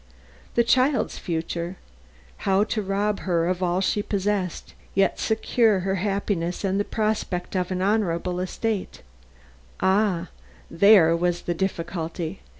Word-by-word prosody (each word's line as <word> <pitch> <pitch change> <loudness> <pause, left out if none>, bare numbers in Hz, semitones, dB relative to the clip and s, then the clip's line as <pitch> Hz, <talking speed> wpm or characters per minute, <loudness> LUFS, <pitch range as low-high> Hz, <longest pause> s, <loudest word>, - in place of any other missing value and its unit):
The 235 - +5
child's 255 +4 +2
future 170 +1 -3 0.6
how 195 +1 +2
to 215 0 -2
rob 200 +1 -1
her 170 -3 0
of 180 0 -1
all 180 +1 +1
she 205 +2 +1
possessed, 200 -3 -2 0.2
yet 195 -2 +2
secure 220 -2 +2
her 190 +1 -1
happiness 195 -3 -1
and 195 0 +1
the - - +2
prospect 210 -5 -2
of 180 -1 0
an 185 0 -1
honorable 180 -4 0
estate 200 +2 -3 0.8
ah, 190 -3 +1 0.4
there 165 -2 +6
was 175 0 0
the 175 - -1
difficulty! 170 -1 -3
190 Hz, 130 wpm, -24 LUFS, 175-205 Hz, 0.8 s, there